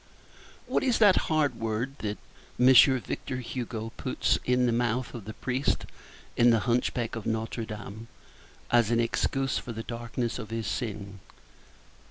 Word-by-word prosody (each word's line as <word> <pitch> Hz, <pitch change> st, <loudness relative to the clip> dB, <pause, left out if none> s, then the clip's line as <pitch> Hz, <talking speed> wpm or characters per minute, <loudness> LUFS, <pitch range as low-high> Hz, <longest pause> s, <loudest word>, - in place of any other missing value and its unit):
What -, -, 0 dB
is 255 Hz, -3 st, +2 dB
that 205 Hz, -4 st, +6 dB
hard 150 Hz, -6 st, +1 dB
word 115 Hz, +4 st, -2 dB
which 125 Hz, +5 st, +4 dB
M. 130 Hz, -2 st, +1 dB
Victor 130 Hz, +2 st, -4 dB
Hugo 115 Hz, -3 st, -5 dB
puts -, -, 0 dB
into 125 Hz, 0 st, +3 dB
the 120 Hz, -, +2 dB
mouth 120 Hz, +1 st, 0 dB
of 115 Hz, -5 st, -8 dB
the 110 Hz, -, -7 dB
priest 130 Hz, +2 st, -1 dB, 0.5 s
in 120 Hz, 0 st, +5 dB
The 115 Hz, -2 st, +4 dB
Hunchback 120 Hz, 0 st, 0 dB
of 115 Hz, -, -5 dB
Notre 110 Hz, +1 st, -2 dB
Dame 105 Hz, +1 st, -8 dB, 0.6 s
as 120 Hz, -3 st, +4 dB
an 115 Hz, 0 st, +2 dB
excuse 135 Hz, +3 st, 0 dB
for 120 Hz, -, -7 dB
the 115 Hz, +1 st, -5 dB
darkness 120 Hz, +1 st, -4 dB
of 110 Hz, -3 st, -7 dB
his 115 Hz, -1 st, -3 dB
sin? 100 Hz, -1 st, -4 dB
120 Hz, 155 wpm, -28 LUFS, 110-125 Hz, 0.6 s, that